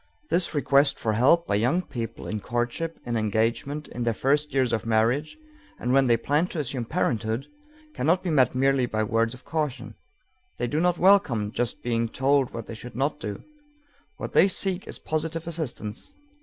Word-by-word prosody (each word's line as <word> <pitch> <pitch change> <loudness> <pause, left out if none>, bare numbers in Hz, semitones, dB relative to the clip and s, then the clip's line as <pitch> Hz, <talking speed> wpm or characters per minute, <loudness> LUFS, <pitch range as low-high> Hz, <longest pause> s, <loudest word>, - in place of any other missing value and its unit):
This 175 -2 +2
request 140 -1 +3
for 110 - -1
help 145 +10 +4
by - - -2
young 125 - +2
people 115 -7 -6
in 110 - -3
courtship, 120 +9 -2
in 120 -1 -2
engagement, 115 +7 -1
in 120 - -6
their 115 -2 0
first 145 +5 +1
years 130 -3 +1
of 110 - 0
marriage, 115 - +1 0.4
and 125 +2 -1
when 135 -1 +4
they 120 -1 +4
plan 145 +8 +1
to 180 - -7
assume 130 -4 -2
parenthood, 115 -5 -1 0.5
cannot 180 - +1
be 180 - -1
met 130 -4 +3
merely 135 -1 +2
by 110 -1 -1
words 115 +2 0
of 130 - -17
caution. 150 -6 -3 0.6
They 120 - -1
do 145 +6 -1
not 175 0 +2
welcome 165 - +3
just 120 0 -3
being 115 -1 0
told 135 +1 +2
what 115 -1 -6
they - - -8
should 115 +1 -9
not 140 +4 -1
do. 105 -1 -6 0.7
What - - -6
they - - +6
seek 190 -1 0
is - - -4
positive 160 +1 -3
assistance. 155 - -4
130 Hz, 185 wpm, -26 LUFS, 115-155 Hz, 0.7 s, they